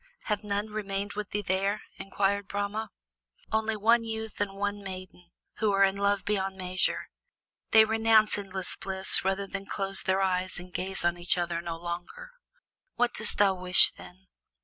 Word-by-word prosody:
"Have 210 -1 -2
none 205 +1 -3
remained 200 -1 -4
with 210 -1 -5
thee 205 0 -3
there?" 195 +2 -1 0.2
inquired 200 +1 -1
Brahma. 205 +2 -3 0.6
"Only 220 0 0
one 230 +3 +3
youth 220 -1 -6
and 195 -1 -2
one 205 +1 -3
maiden, 185 -2 -9 0.3
who 215 -2 +1
are 195 0 +4
in 195 0 +3
love 200 0 0
beyond 195 -2 -1
measure; 185 0 -2 0.6
they 220 0 +7
renounce 220 0 +4
endless 195 -2 -3
bliss 190 0 +5
rather 195 +1 -1
than 195 0 -7
close 195 -1 0
their 190 +1 +1
eyes 185 0 -1
and 180 0 -9
gaze 190 -1 -2
on 175 0 0
each 175 +1 +2
other 170 -1 -2
no 170 -1 -5
longer." 175 - -7 0.6
"What 245 0 +1
dost 215 0 +2
thou 200 -2 +4
wish, 180 0 +5
then?" 185 +2 -15
195 Hz, 170 wpm, -28 LUFS, 185-210 Hz, 0.6 s, they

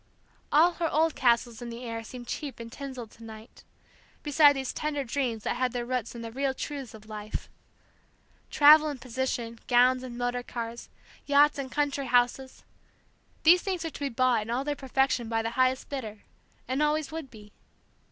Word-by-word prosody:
All 325 +4 +6
her 330 -2 +1
old 320 +1 +2
castles 235 -2 +1
in 240 - -6
the 235 +1 -8
air 230 -1 -5
seemed 245 +2 -9
cheap 280 -3 -5
and 230 0 -8
tinselled 260 -5 -7
to 230 - -16
night, 220 +1 -12 0.6
beside 295 0 +6
these 265 -2 -4
tender 300 -2 -2
dreams 235 -3 -2
that - - -1
had 255 -1 0
their 240 -1 -2
roots 250 -1 -3
in 230 - -7
the 230 - -6
real 265 +2 -1
truths 275 -6 -6
of 215 0 -14
life. 215 -1 -6 1.0
Travel 305 +1 +7
and 285 -3 -4
position, 240 -2 -3
gowns 250 +1 +4
and 250 -2 -8
motor 245 0 -1
cars, 235 -1 -6 0.4
yachts 290 +1 +4
and 265 -2 -5
country 285 -2 -1
houses, 245 +2 +1 0.8
these 350 +3 +7
things 370 -4 -3
were 325 - -4
to - - -10
be 285 -1 -1
bought 250 -2 +2
in 210 - -7
all 245 +3 0
their 295 +1 -1
perfection 265 -3 0
by 225 -1 0
the 225 - -2
highest 255 +1 +1
bidder, 220 -7 -6 0.4
and 260 +4 -1
always 300 -1 +1
would 320 -4 -6
be. 210 -3 -14
255 Hz, 185 wpm, -28 LUFS, 235-285 Hz, 1.0 s, Travel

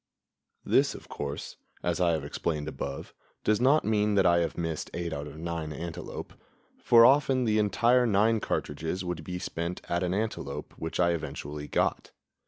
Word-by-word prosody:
This, - - +3
of - - -11
course, 70 0 -5 0.3
as 85 +1 0
I 85 -1 +4
have 80 - -1
explained 75 -3 -2
above, 70 -2 -5 0.3
does 105 +1 +2
not 140 +5 +4
mean 105 -1 +2
that 95 -2 +4
I 85 -1 +5
have 85 - -1
missed 80 -2 -3
eight 85 -2 -3
out 70 0 -4
of 75 +1 -10
nine 80 -1 -4
antelope, 85 +3 -6 0.5
for 115 -1 +7
often 135 -1 +4
the 110 -1 +2
entire 120 +5 +3
nine 110 +2 +3
cartridges 80 +2 -3
would 90 -3 -4
be 90 +3 -4
spent 85 0 -4
at 85 0 0
an 90 0 0
antelope 105 -10 -3
which 80 - -5
I 85 -1 +4
eventually 75 -3 -5
got. - - 0
85 Hz, 175 wpm, -28 LUFS, 80-105 Hz, 0.5 s, for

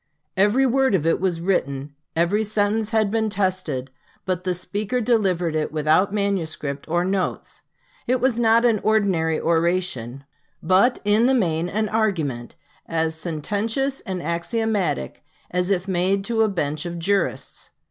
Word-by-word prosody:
Every 210 +8 +3
word 265 -3 +3
of 160 -4 0
it 165 - +2
was 175 -3 -1
written, 140 -6 -1 0.2
every 175 +6 +2
sentence 215 0 0
had 220 -3 +1
been 220 0 +1
tested; 185 -10 -2 0.3
but 185 -1 -2
the 180 -1 0
speaker 210 +7 -2
delivered 195 -8 +1
it 155 -1 -1
without 155 +6 +2
manuscript 165 -9 -2
or 175 +2 +1
notes. 190 -1 -2 0.5
It 255 +1 +2
was 245 -1 +1
not 230 +1 +4
an 225 -3 +3
ordinary 190 -8 +1
oration, 165 -7 0 0.4
but, 190 +9 +4
in 215 +3 +4
the 265 - +3
main, 170 -6 0
an 215 +3 -1
argument, 165 - -1 0.3
as 160 -1 0
sententious 205 - -2
and 185 -2 -5
axiomatic 175 - -2 0.3
as 180 +1 0
if 190 -1 0
made 190 +2 +1
to 230 0 0
a 220 - +3
bench 155 -4 -2
of 170 0 -5
jurists. 195 +4 -1
190 Hz, 145 wpm, -23 LUFS, 165-215 Hz, 0.5 s, not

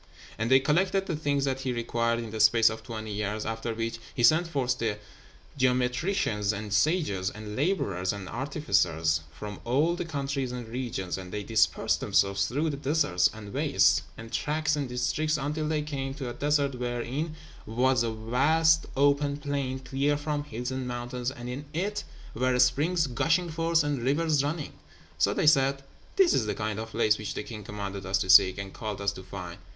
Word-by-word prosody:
And 115 +1 0
they 130 0 +7
collected 185 +7 +1
the 170 - -2
things 145 -2 0
that 135 -1 -1
he 130 -1 -2
required 115 0 0
in 115 -2 -5
the 110 - -5
space 110 +1 +5
of 110 - -7
twenty 110 -2 -6
years; 105 +1 -2
after 115 +1 -3
which 115 0 -3 0.2
he 120 - -1
sent 160 +8 +5
forth 130 -6 -1
the 110 -3 -1 0.6
geometricians 125 - +1
and 105 -1 -5
sages, 105 - +1
and 105 0 -8
labourers 100 - 0
and 100 -2 -6
artificers, 90 - 0
from 105 +5 -8
all 145 +8 +2
the 175 - -3
countries 140 -5 -3
and 125 -2 -6
regions, 115 -7 -3
and 90 -1 -9
they 105 +1 -4
dispersed 110 +1 +2
themselves 100 0 +2
through 150 +7 0
the 140 - -5
deserts 135 - +2
and 105 -2 -10
wastes, - - +3 0.2
and 115 0 -10
tracts 155 +1 0
and 140 -3 -3
districts, 130 +6 0
until 150 +2 -2
they 155 -1 0
came 135 -3 -4
to 135 -3 -5
a 120 - -4
desert 145 0 +1
wherein 125 +5 -3 0.3
was 125 +2 +2
a 115 - 0
vast 145 +9 +2
open 140 +1 +3
plain, 140 -2 -2
clear 135 +2 0
from 145 0 -3
hills 125 -1 -5
and 130 -1 -3
mountains, 120 0 -3
and 125 -2 -8
in 130 +4 -5
it 200 +5 -1 0.3
were 125 +2 +1
springs 145 +7 +3
gushing 165 +7 +1
forth, 165 0 +2
and 145 -4 -1
rivers 145 +3 +2
running. 150 +1 -3 0.5
So - - +3
they - - +1
said, 135 -2 +4 0.3
"This 385 -5 +5
is 110 - +1
the 105 - -1
kind 110 0 -3
of 110 0 -5
place 110 -1 +2
which 105 -2 -5
the - - -3
king 105 -2 -8
commanded 100 -1 -5
us 95 +1 +2
to 95 -1 +2
seek, 95 +1 +7
and 100 -1 -6
called 105 -3 -5
us 100 0 0
to 100 - -9
find." 90 -2 -8
125 Hz, 190 wpm, -28 LUFS, 110-145 Hz, 0.6 s, they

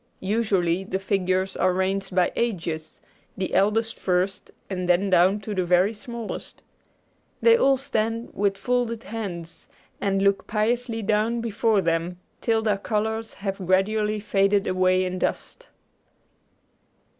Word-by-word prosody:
Usually 195 -4 +1
the 190 0 -2
figures 190 -1 0
are 185 0 +2
ranged 190 0 -1
by 180 -1 +3
ages, 170 -9 -3 0.4
the 190 -1 -3
eldest 215 +4 +1
first 185 +2 -1 0.2
and 180 -2 -3
then 190 +3 +3
down 185 +3 +4
to 210 +1 -5
the 185 -2 0
very 180 +4 +3
smallest. 230 +1 -7 0.8
They 465 0 +6
all 275 - +4
stand 230 -3 -2
with 200 -1 0
folded 235 +1 -1
hands, 175 -7 -7 0.3
and 195 -1 +1
look 200 0 +1
piously 225 +2 -1
down 220 +3 +1
before 225 -2 +1
them, 170 +1 -1 0.2
till 225 -1 +1
their 210 -2 +1
colors 220 +2 -2
have 195 -1 -4
gradually 210 +3 +1
faded 200 0 +2
away 185 0 +2
in 185 0 -3
dust. - - -3
200 Hz, 135 wpm, -24 LUFS, 185-225 Hz, 0.8 s, They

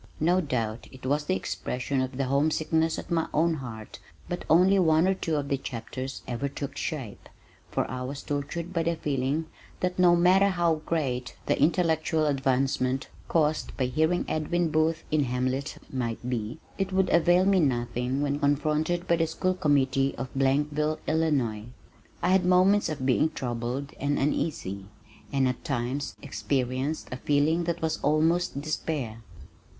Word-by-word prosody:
No 175 +4 +3
doubt 115 -7 -2
it 130 -1 -12
was 145 +3 +1
the 185 - +1
expression 130 -5 -2
of 130 -1 -3
the 135 - +1
homesickness 160 +4 +1
at - - -7
my 165 -1 +1
own 165 +2 +2
heart 115 -5 -8 0.3
but 175 - -4
only 185 +4 +5
one 160 0 +4
or 190 - +3
two 165 -4 -2
of 145 -1 -1
the 140 -1 0
chapters 130 +2 -6
ever 125 +3 -2
took 140 0 -6
shape, 130 -10 -5 0.4
for - - 0
I 125 0 -5
was 135 +2 -5
tortured 160 +5 -3
by 170 - +1
the 170 +1 0
feeling 145 +1 -1 0.4
that 180 0 -1
no 175 -1 +6
matter 185 +3 +5
how 170 -4 +1
great 130 -7 -1
the - - +1
intellectual 160 0 +2
advancement 135 -1 0 0.2
caused 155 -1 0
by 130 - +1
hearing 160 +7 +1
Edwin 165 +2 0
Booth 155 +1 +1
in 150 -2 +2
Hamlet 130 +3 -2 0.2
might 120 -2 -3
be, 115 0 -3 0.2
it 195 0 -1
would 190 0 +2
avail 175 +2 +4
me 195 -1 +4
nothing 125 -1 0
when 145 0 0
confronted 155 +4 +1
by 170 - +3
the 165 0 +1
school 185 +3 0
committee 135 -4 +2
of 130 - -5
Blankville, 145 +3 +1
Illinois. 135 -10 0 0.6
I 175 - +3
had 190 0 +4
moments 185 +2 +4
of 145 -4 -3
being 135 +4 +3
troubled 125 0 -4
and 145 +1 0
uneasy 100 - -2 0.4
and 135 -2 +2
at 125 -1 -3
times 135 0 -2
experienced 130 +7 -2
a 125 - -3
feeling 150 +5 +2
that 170 -1 -2
was 160 - 0
almost 160 +1 +2
despair. 145 -7 -3
145 Hz, 160 wpm, -27 LUFS, 130-165 Hz, 0.6 s, no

